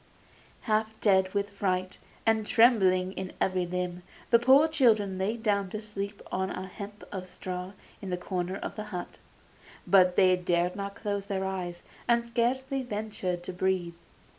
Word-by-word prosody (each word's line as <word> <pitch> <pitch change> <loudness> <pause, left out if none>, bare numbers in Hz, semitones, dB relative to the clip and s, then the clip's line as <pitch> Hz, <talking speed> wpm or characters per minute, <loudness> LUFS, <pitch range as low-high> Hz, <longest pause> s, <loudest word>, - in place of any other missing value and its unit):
Half 220 -1 0
dead 190 -2 +3
with 200 0 0
fright, 185 -2 -1 0.3
and 225 -1 +3
trembling 190 -6 +4
in 190 -1 -5
every 185 -2 +1
limb, 180 0 -3 0.3
the 235 - +7
poor 265 +6 +6
children 220 -11 +2
lay 210 +5 0
down 205 -4 0
to 215 - -4
sleep 205 -1 -6
on 190 0 -1
a 185 - -5
heap 205 +2 -9
of 185 -2 -5
straw 180 +1 -6 0.3
in 195 - -6
the 180 - -1
corner 180 0 -3
of - - -6
the 215 - -5
hut; 180 -4 -6 0.7
but 185 -2 +5
they 185 -1 +5
dared 180 0 0
not 200 0 -5
close 200 -2 -3
their 190 -2 -1
eyes, 180 -2 -4 0.2
and 235 0 +3
scarcely 260 +3 0
ventured 205 -6 -3
to 185 - -6
breathe. 180 -1 0
195 Hz, 165 wpm, -29 LUFS, 185-215 Hz, 0.7 s, the